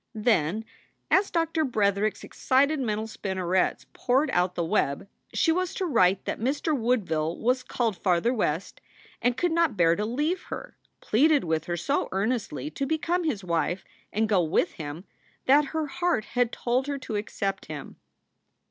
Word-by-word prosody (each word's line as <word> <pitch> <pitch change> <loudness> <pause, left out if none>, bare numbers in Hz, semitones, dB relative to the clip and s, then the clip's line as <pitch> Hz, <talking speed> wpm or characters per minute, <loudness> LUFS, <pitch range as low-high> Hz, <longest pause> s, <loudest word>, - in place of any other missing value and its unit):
Then, 215 -2 +1 0.5
as 390 +2 +4
Doctor 330 -1 0
Bretherick 210 -5 +1
s - - -14
excited 280 +3 +2
mental 220 -4 -1
spinnerets 190 -4 -1
poured 270 +4 +1
out 180 -2 +1
the 170 - -1
web, 165 -3 0 0.2
she 325 - +2
was 365 +1 -1
to 380 - -1
write 195 - +3
that - - -3
Mr. 285 +6 0
Woodville 185 - 0
was 255 +3 +1
called 235 -4 -1
farther 185 +6 +2
West 185 -6 -2 0.4
and 245 0 +1
could 350 +3 +1
not 330 -9 +2
bear 165 -1 +4
to 210 - -2
leave 295 - -1
her, - - -7 0.3
pleaded 290 +6 +3
with 160 -2 -1
her 175 0 -2
so 175 - 0
earnestly 225 +8 -2
to 275 - -3
become 335 +3 0
his 230 -11 -1
wife 170 +1 -1 0.3
and 220 +2 +1
go 205 -4 +3
with 160 -1 +1
him, 155 +4 -7 0.4
that 285 +3 +5
her 315 +2 -2
heart 325 - 0
had 245 -1 +2
told 250 +3 -1
her 285 -1 -2
to 240 -5 -5
accept 195 -1 -3
him. 150 -3 -7
225 Hz, 165 wpm, -27 LUFS, 185-285 Hz, 0.5 s, that